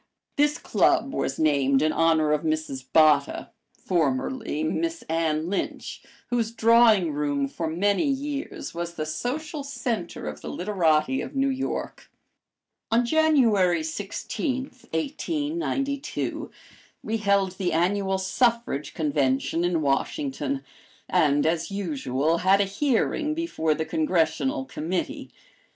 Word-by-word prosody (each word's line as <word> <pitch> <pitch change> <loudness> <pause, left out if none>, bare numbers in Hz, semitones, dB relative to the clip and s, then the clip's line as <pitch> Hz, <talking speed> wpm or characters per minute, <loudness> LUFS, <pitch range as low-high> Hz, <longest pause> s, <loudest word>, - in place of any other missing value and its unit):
This 295 +1 +2
club 275 - +2
was 135 - -2
named 140 -3 +3
in 155 - +2
honor 160 -2 +3
of 150 -1 +2
Mrs. 155 -4 -2
Botta, 150 -3 +3 0.3
formerly 160 - -1
Miss 330 - -2
Anne 160 -1 0
Lynch, 195 +2 -3 0.3
whose 235 -2 +1
drawing 230 -6 +5
room 145 -1 0
for 165 +4 -4
many 200 - +1
years 280 +1 -3
was 170 0 -5
the 155 - -3
social 285 - -4
center 245 -9 -4
of 75 0 -6
the - - -6
literati 180 +3 +1
of - - -7
New 270 0 +2
York. 265 0 -4 0.8
On 235 +2 +3
January 235 - +3
16, 205 - -3 0.3
1892, 290 - -2 0.5
we 225 +1 -1
held 200 -3 +2
the 185 -2 0
Annual 190 +4 +1
Suffrage 225 - 0
Convention 145 +1 0
in 175 -3 +1
Washington, 270 - -1 0.4
and, 145 -1 +3
as 165 +1 0
usual, 160 -5 -1
had 190 +2 +4
a 200 - +3
hearing 290 +7 0
before 160 - 0
the 160 - -2
Congressional 155 -5 0
Committee. 165 +6 -4
180 Hz, 120 wpm, -25 LUFS, 155-260 Hz, 0.8 s, drawing